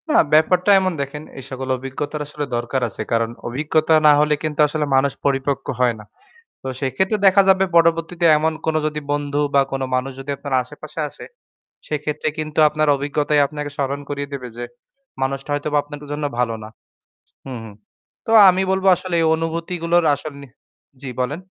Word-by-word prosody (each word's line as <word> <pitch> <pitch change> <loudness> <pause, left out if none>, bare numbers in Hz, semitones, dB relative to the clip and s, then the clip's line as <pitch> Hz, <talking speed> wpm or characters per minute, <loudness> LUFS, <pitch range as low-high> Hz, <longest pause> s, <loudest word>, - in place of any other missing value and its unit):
না, - - +2 0.2
ব্যাপারটা 180 +5 +4
এমন 185 -1 0
দেখেন, 140 +2 -5 0.2
এই - - -9
সকল 130 0 -5
অভিজ্ঞতার 140 +4 -5
আসলে 150 0 -4
দরকার 120 +2 -2
আছে। 105 - -7
কারণ 115 -1 +1 0.2
অভিজ্ঞতা 155 +5 +1
না - - +9
হলে 150 0 +3
কিন্তু 155 -1 -3
আসলে 150 0 -2
মানুষ 135 +1 +2
পরিপক্ক 140 0 0
হয় 125 -2 +2
না। 105 - -12 0.6
তো 135 - -5
সেক্ষেত্রে 190 - 0
দেখা 195 +1 +6
যাবে 190 0 +5
পরবর্তীতে 165 +1 +3
এমন 160 +1 +1
কোন 160 - +1
যদি 150 0 -3
বন্ধু 145 0 -1
বা 140 - +6
কোন 135 0 -2
মানুষ 130 +1 -1
যদি 135 +1 -6
আপনার 140 -1 -5
আশেপাশে 150 +4 -9
আসে - - -12 0.6
সেক্ষেত্রে 150 0 -2
কিন্তু 155 0 -4
আপনার 155 0 0
অভিজ্ঞতাই 145 +1 0
আপনাকে 150 0 -6
স্মরণ 140 0 -2
করিয়ে 140 -1 -4
দেবে 130 -3 -5
যে 120 - -4 0.6
মানুষটা 135 +2 -2
হয়তোবা 145 +1 0
আপনার 145 0 -10
জন্য 145 0 -3
ভালো 120 -2 +1
না। 110 - -8 0.8
হুম, 130 -2 -6
হুম। 110 -2 -10 0.5
তো - - -3 0.2
আমি 185 +1 +2
বলব 190 0 -1
আসলে 180 0 -4
এই - - +2
অনুভূতিগুলোর 170 +1 -1
আসল 145 +1 -8
নে 140 - -11 0.5
জি 135 - -6
বলেন। 140 +6 -2
145 Hz, 175 wpm, -20 LUFS, 135-160 Hz, 0.8 s, না